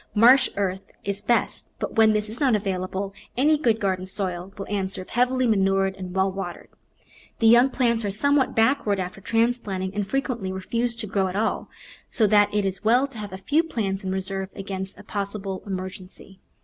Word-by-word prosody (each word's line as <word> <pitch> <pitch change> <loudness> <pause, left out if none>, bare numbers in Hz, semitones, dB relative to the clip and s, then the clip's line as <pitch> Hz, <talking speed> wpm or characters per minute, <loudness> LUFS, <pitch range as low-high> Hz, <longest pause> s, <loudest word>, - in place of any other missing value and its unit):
Marsh 245 +5 +6
earth 190 -1 -1 0.2
is 200 0 -3
best, 240 - 0
but - - -4
where 225 -1 +6
this 215 0 +2
is 220 +3 -5
not 265 -6 +3
available 195 -1 -2 0.2
any 300 +4 +4
good 235 -7 +1
garden 185 -2 -1
soil 185 -1 -3
will 195 - -5
answer 190 -2 -2
if - - -19
heavily 255 +2 +2
manured 195 -3 +2
and 185 -1 -7
well 190 0 +2
watered. 185 -2 -6 0.7
The 225 - 0
young 240 +4 +7
plants 235 -3 +1
are 205 - -1
somewhat 265 +5 +2
backward 225 -3 +2
after 185 +1 -5
transplanting 220 -4 0
and 205 -1 -2
frequently 245 -6 -2
refuse 230 +6 -2
to 230 -1 -5
grow 195 -2 0
at 185 - -5
all, 220 +2 -1 0.4
so 220 - +2
that 205 0 +4
it 205 -1 0
is 190 +1 -3
well 240 +5 +4
to 270 -5 -9
have 205 -2 -6
a 190 - -6
few 290 +11 +2
plants 205 - -3
in 190 - -2
reserve 190 0 -3
against 190 -1 -5
a - - -12
possible 200 -2 -4
emergency. 185 0 -7
200 Hz, 190 wpm, -24 LUFS, 190-230 Hz, 0.7 s, young